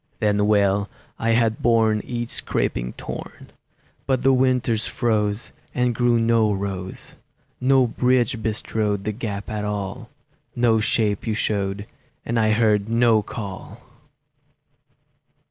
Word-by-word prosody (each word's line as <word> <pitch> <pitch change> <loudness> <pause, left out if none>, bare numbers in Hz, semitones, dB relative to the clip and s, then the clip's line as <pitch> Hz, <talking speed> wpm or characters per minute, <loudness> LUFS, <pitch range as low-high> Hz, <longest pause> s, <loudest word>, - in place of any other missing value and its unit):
Then 105 -1 +2
well 100 -1 +2 0.3
I 115 0 +1
had 115 -1 +1
borne 110 -2 +3
Each 120 -1 -4
scraping - - -1
thorn; - - -8 0.6
But 130 -2 +1
the 135 +1 +5
winters 125 -4 +2
froze, 110 -3 -1 0.2
And 125 -1 +1
grew 120 0 +2
no 115 -2 +3
rose; 95 -2 -5 0.5
No 130 0 +4
bridge 120 -1 +1
bestrode 105 -2 -1
The 105 - -1
gap 105 -2 -5
at 105 -1 -4
all; 105 -2 -4 0.5
No 120 -2 +3
shape 110 -1 +1
you 110 - 0
showed, 100 -2 -1 0.4
And 120 0 0
I 110 -1 +3
heard 110 -1 +2
no 115 -1 +4
call! 100 -2 -8
110 Hz, 125 wpm, -22 LUFS, 105-120 Hz, 0.6 s, the